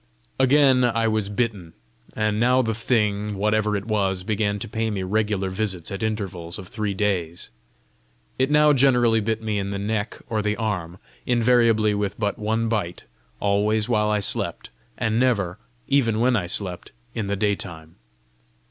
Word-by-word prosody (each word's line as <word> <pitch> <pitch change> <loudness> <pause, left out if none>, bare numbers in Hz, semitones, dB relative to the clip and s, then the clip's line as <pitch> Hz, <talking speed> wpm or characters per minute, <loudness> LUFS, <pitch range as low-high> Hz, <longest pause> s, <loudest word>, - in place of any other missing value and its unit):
Again 130 -1 +5
I 115 -2 +2
was 110 -2 0
bitten; 105 -6 -2 0.4
and 110 -1 0
now 125 +2 +3
the 115 -1 -1
thing, 105 -3 0
whatever 105 +1 +1
it 100 0 -3
was, 95 -4 0
began 105 0 0
to - - -5
pay 110 +1 -2
me 100 -3 -3
regular 100 -1 -1
visits 95 -4 -2
at 100 - -5
intervals 95 -6 -3
of 95 -3 -10
three 105 -2 -3
days. 90 -5 -2 0.9
It 130 +1 +2
now 150 0 +5
generally 125 -4 +4
bit 110 +1 -2
me 105 -2 -1
in 100 0 -3
the 100 - -3
neck 105 +2 -2
or 110 -2 -1
the 105 0 -1
arm, 90 -6 -3 0.3
invariably 115 -3 +3
with 100 0 -2
but 105 -2 -1
one 110 +2 0
bite, 100 -6 -2 0.4
always 105 +1 +1
while 105 -3 +1
I 105 -1 +1
slept, - - 0 0.3
and 110 +1 0
never, 105 -7 +1 0.3
even 120 -6 +2
when 125 +2 +3
I 95 -6 -1
slept, 90 -1 -1 0.2
in 110 -4 -3
the 100 - -1
daytime. 90 -5 -3
105 Hz, 165 wpm, -23 LUFS, 100-115 Hz, 0.9 s, Again